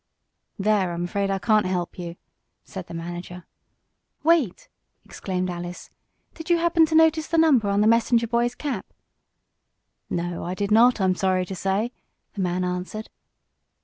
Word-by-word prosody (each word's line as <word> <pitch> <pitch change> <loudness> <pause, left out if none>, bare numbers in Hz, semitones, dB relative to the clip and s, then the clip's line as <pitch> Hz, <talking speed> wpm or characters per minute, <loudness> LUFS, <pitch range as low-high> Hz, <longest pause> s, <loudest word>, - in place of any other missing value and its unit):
"There 200 -3 +1
I'm 170 0 -3
afraid 195 +3 -1
I 195 - 0
can't 215 0 +2
help 180 -1 -3
you," 170 -1 -6 0.5
said 190 -2 -8
the - - -8
manager. 175 +1 -7 0.8
"Wait!" 310 - +2 0.4
exclaimed 185 -1 -3
Alice. 175 0 -7 0.4
"Did 320 +1 -9
you 345 - +5
happen 335 -1 +3
to 315 - -1
notice 320 0 +4
the 330 - 0
number 275 -10 +4
on 200 +1 +2
the 210 - +4
messenger 230 +1 +3
boy's 235 +1 0
cap?" 265 -10 -4 1.2
"No, 175 0 -3
I 180 +2 -4
did 200 +1 -2
not, 235 +2 +5
I'm 190 -1 +3
sorry 185 0 0
to 190 - -6
say," 195 +6 -1 0.4
the 200 - -4
man 180 0 0
answered. 180 +4 -4
195 Hz, 155 wpm, -24 LUFS, 180-240 Hz, 1.2 s, you